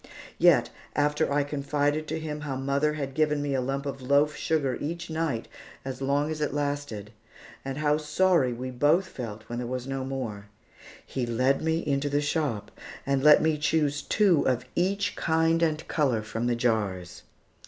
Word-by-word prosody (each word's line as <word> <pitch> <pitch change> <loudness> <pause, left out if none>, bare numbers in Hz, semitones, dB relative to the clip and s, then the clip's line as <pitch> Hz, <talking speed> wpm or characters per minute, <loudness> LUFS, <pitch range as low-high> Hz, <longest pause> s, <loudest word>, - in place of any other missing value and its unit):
Yet, - - +5 0.2
after 150 +1 +1
I 145 0 +2
confided 145 +1 -1
to 160 +1 -3
him 150 -1 -5
how 145 -2 -3
mother 140 +3 0
had 140 -3 -4
given 150 +1 +1
me 145 -1 -1
a 130 - +1
lump 135 +2 -2
of 135 -1 -5
loaf 140 +3 +3
sugar 140 -5 0
each 165 +2 -4
night 160 -8 -2 0.4
as 135 0 -5
long 140 +3 +1
as 155 -1 -4
it 150 -1 -1
lasted, 145 -8 -3 0.5
and 135 0 -4
how 150 0 +2
sorry 155 -2 +2
we 125 +2 -5
both 145 +9 +3
felt 110 - -7
when 120 +2 -5
there 125 - -3
was 125 0 -4
no 135 0 -3
more, 120 -7 -5 0.6
he 125 -3 -3
led 130 +4 +2
me 160 +1 0
into 140 0 0
the 145 +1 +1
shop 145 -7 -1 0.3
and 135 -1 +1
let 150 0 +7
me 160 -1 +1
choose 150 -1 +1
two 190 -2 +3
of 125 -1 0
each 195 +3 0
kind 165 0 +2
and 160 -1 0
color 130 -8 +1
from 115 +2 -3
the 120 - +1
jars. 100 -7 -1
145 Hz, 180 wpm, -27 LUFS, 130-155 Hz, 0.6 s, let